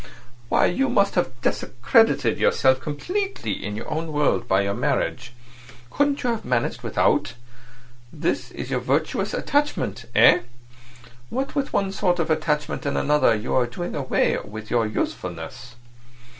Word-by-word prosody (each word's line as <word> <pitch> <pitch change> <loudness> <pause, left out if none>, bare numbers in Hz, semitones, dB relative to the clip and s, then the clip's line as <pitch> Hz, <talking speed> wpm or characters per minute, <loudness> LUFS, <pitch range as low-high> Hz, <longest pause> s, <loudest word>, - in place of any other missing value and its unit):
Why, - - +4
you 270 +9 +1
must 200 -4 +2
have 130 -9 -1
discredited 125 - +2
yourself 130 0 +3
completely 375 - -3
in 105 +1 -4
your 110 - -6
own 160 +1 -3
world 145 -5 +1
by 95 -2 +3
your 100 0 -1
marriage. 130 0 -1 0.6
Couldn't 285 0 +1
you 245 - +1
have 230 - -3
managed 120 -2 -1
without? - - +1 0.8
This 150 - -2
is - - -7
your - - +1
virtuous - - 0
attachment—eh? 290 -9 +2 0.9
What 265 +3 -3
with 280 -2 -1
one 195 -1 0
sort 180 -2 +1
of 165 -1 -1
attachment 150 -2 -1
and - - -1
another 145 -5 +3
you 105 - -3
are 125 -2 +3
doing 175 +9 -5
away 135 -3 +1
with 110 +1 -9
your 115 -2 +2
usefulness." 105 +4 -5
145 Hz, 145 wpm, -23 LUFS, 120-195 Hz, 0.9 s, Why